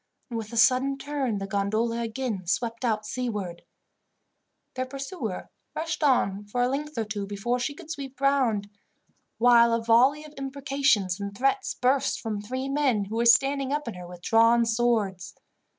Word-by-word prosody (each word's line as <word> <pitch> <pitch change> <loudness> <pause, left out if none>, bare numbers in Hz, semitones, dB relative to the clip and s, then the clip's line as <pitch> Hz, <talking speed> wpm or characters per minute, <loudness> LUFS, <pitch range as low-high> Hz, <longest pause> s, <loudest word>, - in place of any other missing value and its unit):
and, 230 - -2
with 215 0 -7
a 235 - -5
sudden 255 +5 +4
turn, 275 -6 -2
the 195 - -4
gondola 215 +4 -1
again 225 -5 -3
swept 230 +6 -1
out 215 -3 0
seaward. 210 -7 -4 1.1
Their 255 0 -3
pursuer 270 - -6 0.2
rushed 325 0 -3
on 210 -9 +2
for 245 +4 0
a - - +3
length 290 +2 -4
or 225 - +1
two 205 -2 -4
before 205 +5 -2
she 285 +4 -3
could 320 -1 -10
sweep 275 -4 -7
round, 260 -7 +2 0.7
while 235 0 +5
a 230 - -2
volley 255 +6 +4
of 300 - -13
imprecations 270 -8 0
and 200 0 -6
threats 275 - 0
burst 260 +2 +1
from 215 -3 -4
three 255 +5 -4
men 275 -7 +1
who 210 +3 -6
were 235 - +1
standing 275 +2 +4
up 295 -2 -2
in 230 - -3
her 180 -1 -9
with 175 0 -12
drawn 230 +1 +4
swords. 220 -6 0
235 Hz, 170 wpm, -26 LUFS, 210-275 Hz, 1.1 s, while